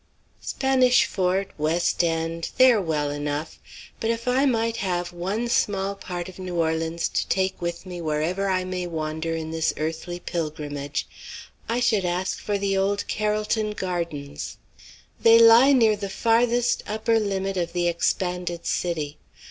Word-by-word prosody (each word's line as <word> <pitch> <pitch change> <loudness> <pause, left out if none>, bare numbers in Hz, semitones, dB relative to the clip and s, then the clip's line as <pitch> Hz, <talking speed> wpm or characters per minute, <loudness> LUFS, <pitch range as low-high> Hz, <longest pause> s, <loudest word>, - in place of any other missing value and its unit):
Spanish 255 -2 +3
Fort 190 +1 0
West 165 +3 +1
End 165 0 -1
they 255 0 +8
are 220 -4 +2
well 150 -4 -1
enough; 145 +2 -4 0.4
but 225 - -1
if 230 +1 -2
I 260 +3 +3
might 230 -2 0
have 180 -4 -2
one 195 +7 -2
small 200 -4 +1
part 180 -3 -6
of 185 0 -11
New 185 -1 -5
Orleans 165 0 0
to - - -1
take 190 -1 0
with 170 +1 -4
me 180 -2 -7
wherever 165 +5 -1
I 185 -1 +1
may 185 -1 -3
wander 160 0 -3
in 160 -1 -4
this 160 0 0
earthly 160 +3 -4
pilgrimage, 150 -4 -4 0.6
I 235 +2 +1
should 215 -5 +2
ask 180 +1 -1
for 205 -1 -1
the 195 0 0
old 200 +1 0
Carrollton 215 0 0
Gardens. 170 -7 -4 0.6
They 230 0 +7
lie 230 +4 +8
near 225 -5 +5
the 200 -1 -5
farthest 235 +3 +2
upper 220 +2 +1
limit 195 -2 -2
of 175 -2 -1
the 175 -1 +1
expanded 175 0 -1
city. 155 -4 -2
185 Hz, 155 wpm, -24 LUFS, 165-215 Hz, 0.6 s, they